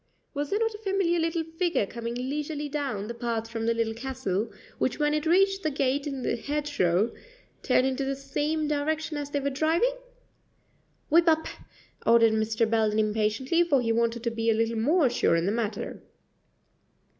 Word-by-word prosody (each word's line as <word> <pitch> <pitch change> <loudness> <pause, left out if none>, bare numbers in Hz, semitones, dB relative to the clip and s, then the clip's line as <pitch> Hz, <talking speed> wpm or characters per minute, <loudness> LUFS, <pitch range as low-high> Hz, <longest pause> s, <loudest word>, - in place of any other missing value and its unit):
was 290 -1 -3
there 405 - +1
not 450 0 0
a 420 - -9
familiar 385 -4 +1
little 330 0 0
figure 325 - 0
coming 235 +2 -5
leisurely 290 +4 -3
down 275 -8 -3
the 235 - -5
path 230 -1 -3
from 225 0 -4
the 230 - +3
Little 225 -1 0
Castle, 230 -4 -3 0.3
which 260 - 0
when 295 0 +1
it 305 +1 -1
reached 390 +3 +3
the 315 - 0
gate 280 0 0
in 270 -3 -4
the - - 0
hedgerow 265 -9 0 0.5
turned 255 - +3
in 265 0 0
the 275 0 -1
same 295 +3 -2
direction 305 +1 -1
as 290 -1 -4
they 285 - -1
were 280 0 -1
driving? 325 - +2 1.2
"Whip 335 +2 +5
up," 320 0 +2 0.6
ordered 230 -1 +5
Mr. 220 +1 +1
Belden 220 -1 +1
impatiently, 220 +8 +1
for 290 -6 +2
he 230 -2 0
wanted 235 0 0
to 235 - 0
be 230 0 -1
a 225 - +4
little 225 0 0
more 300 +6 +3
sure 240 -8 +2
in 165 0 +1
the 195 - +1
matter. 220 0 -3
270 Hz, 180 wpm, -27 LUFS, 230-310 Hz, 1.2 s, Whip